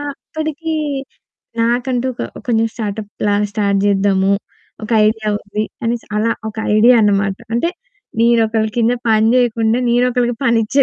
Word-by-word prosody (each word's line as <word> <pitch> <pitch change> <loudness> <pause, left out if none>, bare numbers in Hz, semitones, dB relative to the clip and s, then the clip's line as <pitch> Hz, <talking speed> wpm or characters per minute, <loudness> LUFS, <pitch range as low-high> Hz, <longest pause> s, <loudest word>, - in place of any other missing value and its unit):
ఆప్పడికి 315 +2 -5 0.9
నాకంటూ 245 +2 0
ఒక - - -5 0.3
కొంచెం 225 -1 +2
స్టార్టప్‌లా 210 -1 -3 0.2
స్టార్ట్ 200 -2 +1
జేద్దాము. 195 -1 +2 0.5
ఒక - - -8 0.2
ఐడియా 215 0 -1
ఉంది. 205 +1 -4 0.2
అనేసి 235 0 -2
అలా 225 +2 +1 0.2
ఒక 215 - -19 0.2
ఐడియా 240 +3 +6
అనమాట. 200 -1 +1 0.2
అంటే, 335 +9 +1 0.5
నేనొకళ్ళ 225 -2 +2
కింద 235 +1 +3 0.2
పని 220 0 +4
జేయకుండా 230 -2 +2
నేనొకళ్ళకి 245 0 +1
పనిచ్చే 235 +4 +3
225 Hz, 120 wpm, -17 LUFS, 210-245 Hz, 0.9 s, ఐడియా